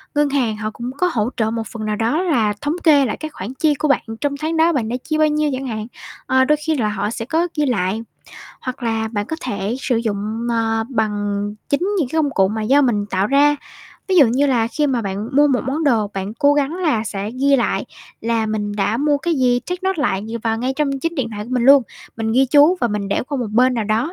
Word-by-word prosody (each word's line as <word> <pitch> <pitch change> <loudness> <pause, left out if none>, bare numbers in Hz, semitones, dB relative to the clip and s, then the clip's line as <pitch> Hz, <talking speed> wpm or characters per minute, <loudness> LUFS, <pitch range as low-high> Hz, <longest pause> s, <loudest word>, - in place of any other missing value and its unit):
ngân 295 -1 +3
hàng 250 -6 0
họ 215 0 -3
cũng 240 +3 -6
có 360 +4 +2
hỗ 215 0 0
trợ 220 -1 +1
một 225 -1 -3
phần 220 -3 -6
nào 215 0 -1
đó 235 - 0
là 230 - +1
thống 290 +2 -1
kê 290 -4 +5
lại 220 - -3
cái 310 - -5
khoản 225 0 -7
chi 300 +2 +2
của 305 - -1
bạn 280 - +2 0.2
trong 285 -1 -1
tháng 320 +2 -2
đó 330 +1 +4
bạn 230 -5 -1
đã 245 - -2
chi 310 -1 -1
bao 310 0 +4
nhiêu 300 0 +1
chẳng 260 +1 -4
hạn. 215 -1 -4 0.4
Ờ, 260 0 +3
đôi 300 +2 +3
khi 320 - +1
là 220 -6 0
họ 205 0 -2
sẽ 230 0 -5
có 325 +7 0
ghi 300 - +2
lại. 210 -3 0 0.6
Hoặc 255 0 -6
là 225 -1 -1
bạn 205 -2 -3
có 320 - -4
thể 205 -1 -3
sử 250 -4 0
dụng, 220 +1 -2
ờ, 225 -1 0
bằng 220 -5 0 0.5
chính 285 - +1 0.2
những 280 -7 0
cái 320 - -2
công 285 - 0
cụ 190 -1 +3
mà 220 +1 -3
do 275 +6 +4
mình 210 -6 +1
tạo 190 0 0
ra. 290 +3 +4 0.5
Ví 375 - +2
dụ 295 -6 +8
như 260 +5 +2
là 240 -4 +2
khi 295 +3 0
mà 250 -4 0
bạn 200 +3 -4
mua 295 0 +6
một 260 -4 +2
món 300 +4 -1
đồ, 225 -7 +2
bạn 195 +3 -4
cố 285 +1 +3
gắng 290 +2 0
là 305 -12 0
sẽ 200 0 -4
ghi 275 +3 +2
lại 240 - 0 0.4
là 225 -1 0
mình 210 -1 -3
đã 210 +2 +1
mua 290 +1 +1
cái 335 +2 -1
gì, 250 -2 +2
take 360 +8 -5
note 380 -6 0
lại 200 -4 0 0.2
vào 225 -1 0
ngay 255 +2 -1
trong 275 -3 -1
chính 330 +3 -2
điện 245 -6 -2
thoại 210 -1 -5
của 235 - -11
mình 250 -2 +1
luôn. 275 0 +7 0.3
Mình 220 -1 -1
ghi 265 +3 +4
chú 295 +6 +5
và 240 - +2
mình 205 -2 -3
để - - 0
qua 285 -2 -2
một 240 -4 -2
bên 250 +2 +4
nào 225 -3 -1
đó, 225 - 0
245 Hz, 260 wpm, -19 LUFS, 220-290 Hz, 0.6 s, dụ